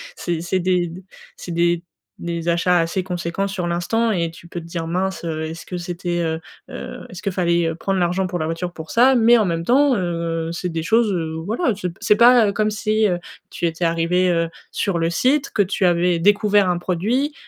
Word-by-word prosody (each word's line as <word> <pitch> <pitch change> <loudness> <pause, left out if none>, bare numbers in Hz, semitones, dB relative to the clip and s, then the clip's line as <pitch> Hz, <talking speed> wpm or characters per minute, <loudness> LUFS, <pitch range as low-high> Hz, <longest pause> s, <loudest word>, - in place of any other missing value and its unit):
C'est 170 - -3
c'est 175 +2 -1
des 180 -1 +1
d 175 +3 -10 0.3
c'est 175 - -8
des 170 0 +1 0.4
des 170 0 -3
achats 175 +1 +3
assez 165 +3 0
conséquents 180 +1 -3
sur 190 -3 -3
l'instant 175 +7 0
et 170 -5 0
tu 165 +1 -14
peux 175 - -6
te 165 - -11
dire: 170 -1 -4
«Mince, 190 +2 -2
heu, 160 -2 -3
est-ce 160 +1 -7
que 180 - -5
c'était 175 0 -3
heu, 160 -1 -1 0.3
heu, 250 -1 -7
est-ce 185 +2 -10
qu'il 200 - -1
fallait, 170 -2 +1
heu, - - -3
prendre 190 +3 -2
l'argent 180 +2 +1
pour 180 -1 -3
la 155 - -2
voiture 165 +2 -3
pour 160 -1 -9
ça?» 255 +3 +5
mais 235 0 +5
en 215 - +2
même 165 -2 -2
temps, 270 +3 +4
heu, 165 -2 -2
c'est 175 +1 -3
des 165 -1 -3
choses, 220 +4 +3
heu, 165 -4 -2
voilà, 230 - 0
c'est 185 -2 -3
p 170 - -13
c'est 210 - +3
pas 235 -3 +6
comme 215 +1 +1
si, 215 0 +1
heu, 180 -3 0 0.3
tu - - -3
étais 165 +1 -1
arrivé, 170 +2 +1
heu, 165 -1 +1 0.2
sur 180 -4 -1
le 165 - +1
site, 270 - +1
que 205 - +2
tu 195 +1 -2
avais 175 -1 +3
découvert 205 +1 +3
un 175 - +1
produit, 215 - -1
180 Hz, 225 wpm, -21 LUFS, 170-205 Hz, 0.4 s, pas